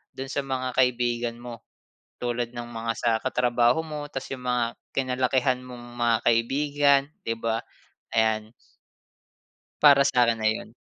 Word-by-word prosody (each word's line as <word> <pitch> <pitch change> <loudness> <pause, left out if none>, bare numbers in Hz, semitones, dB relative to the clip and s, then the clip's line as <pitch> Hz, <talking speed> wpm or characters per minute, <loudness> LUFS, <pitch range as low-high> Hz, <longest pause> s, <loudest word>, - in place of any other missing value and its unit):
dun 135 +1 -5
sa 140 - -1
mga 130 -1 -3
kaibigan 120 -2 +1
mo, 120 -2 -9 0.6
tulad 120 0 -2
ng 120 0 -6
mga 115 0 -3
sa 120 - +1
katrabaho 125 +1 +2
mo 150 -2 -6
tapos 135 - -6
yung 125 - -11
mga 125 -1 +2 0.3
kinalakihan 130 0 +1
mong 125 -1 -10
mga 120 -1 +3
kaibigan 140 +4 +3 0.2
'di 115 - 0
ba, 115 0 -1 0.6
ayan. 110 0 +1 1.3
Para 140 -2 +7
sa'kin, 120 -3 +3
ayun. 110 0 -1
125 Hz, 135 wpm, -26 LUFS, 115-130 Hz, 1.3 s, Para